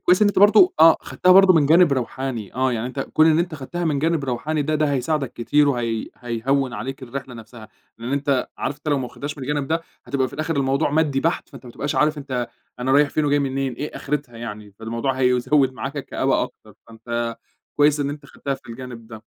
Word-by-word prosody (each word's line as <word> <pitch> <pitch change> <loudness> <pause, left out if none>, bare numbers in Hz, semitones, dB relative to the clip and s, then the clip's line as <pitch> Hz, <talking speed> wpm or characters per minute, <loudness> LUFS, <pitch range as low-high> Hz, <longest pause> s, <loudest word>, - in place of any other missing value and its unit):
كويس 180 +4 +3
إن 205 - +5
أنت 205 - 0
برضو 215 - +6
آه 165 0 +8
خدتها 130 +9 +2
برضو 195 0 +7
من 155 -4 +3
جانب 165 +1 +5
روحاني 130 -4 -3
آه، 130 0 +1
يعني 115 +1 -2
أنت 130 +2 -5
كون 155 +3 +2
إن 160 0 +4
أنت 170 -2 -1
خدتها 165 +5 -5
من 150 -4 0
جانب 160 -1 0
روحاني 145 +4 -2
ده 155 +2 -1
ده 155 -1 +1
هيساعدَك 135 +1 -1
كتير 145 +5 +2
وهي 115 -4 -1
هييهوّن 125 +2 -1
عليك 135 +2 -6
الرحلة 130 0 -7
نَفْسها، 115 -1 -12 0.3
لأن 120 +3 -5
أنت 140 -2 0
عارف 145 - -3
أنت 150 +1 -7
لو 145 -2 +2
ما 130 - -3
واخدهاش 145 +4 -7
من 135 - -5
الجانب 145 0 -2
ده 165 +1 0 0.2
هتبقى 135 -2 0
في - - -12
الآخر 155 +1 -2
الموضوع 140 +2 +1
مادي 150 -2 +1
بَحت، 165 +4 -1
فأنت 135 -4 -13
ما - - -9
تبقاش 145 +4 -3
عارف 150 0 +2
أنت 130 -4 -3 0.3
أنا 130 +2 0
رايح 145 +1 +5
فين 155 - 0
وجاي 145 0 +2
منين 135 -1 -1
إيه 145 +5 -6
آخرتها 140 -5 -4
يعني، 105 -3 -8
فالموضوع 115 +4 -2
هيزوّد 130 +1 +2
معاك 135 +2 -6
الكآبة 140 - 0
أكتر، - - -9
فأنت 115 +1 -4 0.4
كويس 145 0 +4
إن 140 0 -1
أنت 145 -1 -9
خدتها 140 0 -4
في - - -16
الجانب 120 -1 -9
ده، 110 -1 -11
135 Hz, 220 wpm, -22 LUFS, 125-150 Hz, 0.4 s, آه